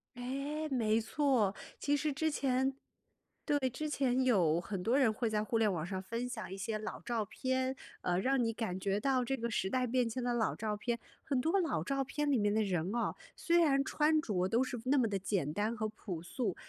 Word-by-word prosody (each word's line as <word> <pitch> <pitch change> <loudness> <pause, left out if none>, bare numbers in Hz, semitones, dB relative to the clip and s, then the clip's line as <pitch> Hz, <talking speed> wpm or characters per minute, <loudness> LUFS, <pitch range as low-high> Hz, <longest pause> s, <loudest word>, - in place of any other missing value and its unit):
哎， 275 +5 -3
没 225 -4 +2
错。 240 -5 +2 0.2
其 290 0 +2
实 295 0 0
之 315 +3 +1
前 265 -2 +1 0.7
对， 290 -3 +2
之 305 +5 -3
前 260 -3 +1
有 175 -10 +3
很 185 0 -4
多 230 +5 +2
人 260 -6 +4
会 230 +2 -1
在 215 -1 0
互 230 - 0
联 220 -2 +3
网 165 -4 -2
上 185 +1 -3
分 230 +5 -3
享 215 -7 -5
一 - - -4
些 215 +3 -2
老 215 0 -6
照 230 -3 -1
片， 260 +4 -1 0.3
呃， 175 0 +1
让 265 +5 +2
你 225 - 0
感 215 -5 -3
觉 195 +1 0
到 260 0 +1
这 270 - 0
个 235 -2 -3
时 190 -3 -1
代 255 -1 +1
变 250 0 +2
迁 240 +2 -3
的 245 - 0
老 235 -2 +1
照 210 -1 -2
片， 235 +2 -2 0.2
很 270 -3 0
多 330 +8 +2
老 235 - 0
照 275 +8 0
片 290 +2 -2
里 265 - +4
面 205 -1 +2
的 220 - +3
人 185 -1 -1
哦， 235 - 0 0.2
虽 340 0 +3
然 275 -5 +4
穿 305 +2 +2
着 185 -8 0
都 230 +6 +2
是 250 -2 -4
那 270 +1 +4
么 235 - +3
的 200 -2 -1
简 190 -6 -1
单 210 +7 -1
和 215 -1 -2
朴 195 -6 -6
素， 195 +3 -2
235 Hz, 240 characters per minute, -34 LUFS, 210-270 Hz, 0.7 s, 人